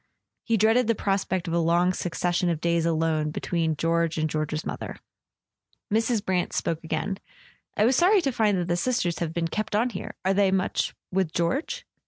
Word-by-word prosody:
He 230 -1 +2
dreaded 225 +3 +3
the 230 - +2
prospect 190 -3 -1
of 165 - -2
a 170 - +2
long 170 +2 +3
succession 175 0 -1
of 165 -3 -1
days 170 0 +1
alone 160 -2 +1
between 160 0 -1
George 165 +1 0
and 155 0 +1
George's 155 0 -2
mother. - - -5 1.0
Mrs. 225 -1 +1
Brant 180 -2 0
spoke 165 0 -2
again. 165 +5 -2 0.6
"I 210 - +4
was 255 +2 +3
sorry 380 +3 +5
to 275 - +1
find 215 -5 +2
that 175 -1 -1
the 175 0 +1
Sisters 180 -5 0
have 165 -2 -2
been 165 0 -1
kept 215 +4 -3
on 235 +4 +2
here. 185 - -6
Are 190 - +3
they 200 0 +3
much 190 0 0 0.2
with 185 -3 0
George 170 - -1
180 Hz, 190 wpm, -26 LUFS, 165-210 Hz, 1.0 s, sorry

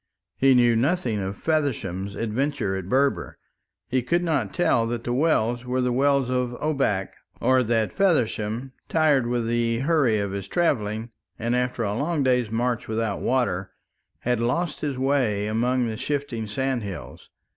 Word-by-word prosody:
He 135 -1 +4
knew 120 -1 +5
nothing 125 - +1
of 95 0 -4
Feversham's 100 - -1
adventure 115 -2 -1
at 95 -1 -5
Berber; 135 +3 +1 0.5
he 130 0 +1
could 170 +8 0
not 140 - 0
tell 120 -9 +2
that 115 0 -3
the 120 - -2
wells 120 -5 +1
were 125 +1 -1
the 125 -1 +1
Wells 140 0 +2
of 125 -1 -1
Obak, 135 -11 0 0.3
or 130 0 +3
that 115 -2 0
Feversham, 125 - 0 0.2
tired 150 -6 +3
with 120 -1 0
the 115 0 0
hurry 140 -7 +3
of 100 -1 -2
his 100 -1 -5
travelling, 115 - 0 0.3
and 115 +2 -1
after 125 -1 -1
a 100 -1 -1
long 145 +5 0
day's 125 -3 +2
march 120 +2 -1
without 110 -2 -2
water, 120 -8 0 0.5
had 125 -1 0
lost 150 +8 -1
his 145 -4 -3
way 130 -7 +1
among 120 +4 +1
the 110 -2 -3
shifting 140 -6 -3
sandhills. 115 -4 -4
125 Hz, 155 wpm, -25 LUFS, 110-135 Hz, 0.5 s, knew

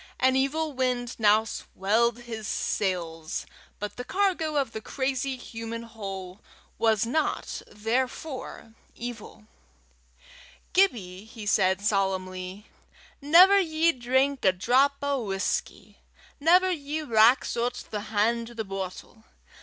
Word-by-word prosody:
An 260 0 +3
evil 295 +3 0
wind 250 -2 -1
now 215 0 +5
swelled 225 +3 0
his 225 -3 -6
sails, 165 -5 -2 0.3
but 210 0 -6
the 250 - -4
cargo 360 -2 0
of 280 -2 0
the 220 - -6
crazy 265 +1 -2
human 230 -1 -6
hull 195 -4 -8 0.4
was 220 -2 +3
not 310 +7 -1
therefore 245 +2 -3 0.2
evil. 220 -2 -8 1.3
"Gibbie," 210 - +1
he 220 -1 -10
said, 190 -2 +2
solemnly, 190 -1 -2 0.6
"never 360 +7 +7
ye 330 -2 +2
drink 260 +1 0
a 190 - +6
drap 250 +9 +3
o' 280 -3 0
whusky. 195 -2 -3 0.4
Never 360 +5 +5
ye 305 -1 -3
rax 230 0 +4
oot 240 +1 -2
the 210 -1 -3
han' 230 +2 +1
to 240 - -12
the 220 -1 -3
boatle. 195 +3 -7
235 Hz, 120 wpm, -27 LUFS, 205-275 Hz, 1.3 s, never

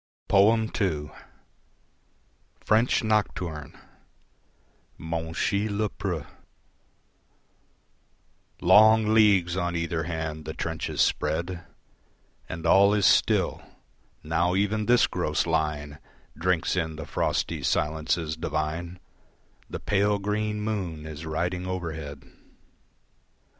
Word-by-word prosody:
II. 100 -7 +2 1.5
French 110 +3 +2
Nocturne 90 -8 -2 1.2
(Monchy 85 +6 -2
Le 105 +1 -1
Preux) 90 -7 -4 2.4
Long 110 0 +6
leagues 100 -6 +4
on 85 -2 -1
either 85 -1 -2
hand 80 -2 -4
the 80 - -6
trenches 80 -1 -3
spread 85 +3 0 0.9
And 80 - -6
all 100 +1 +5
is 100 -2 +2
still; - - +3 0.6
now 85 +3 +1
even 105 +2 0
this 120 0 +5
gross 75 - -1
line 75 -3 -2 0.4
Drinks 90 +1 0
in 80 -3 -2
the 80 -1 -7
frosty - - -1
silences 80 +1 -1
divine 80 +3 -3 0.7
The - - -5
pale, 105 0 +1
green 105 +1 -2
moon 95 -8 -3
is 80 +1 -7
riding 90 +3 -2
overhead. 80 -6 -5
85 Hz, 90 wpm, -26 LUFS, 80-105 Hz, 2.4 s, Long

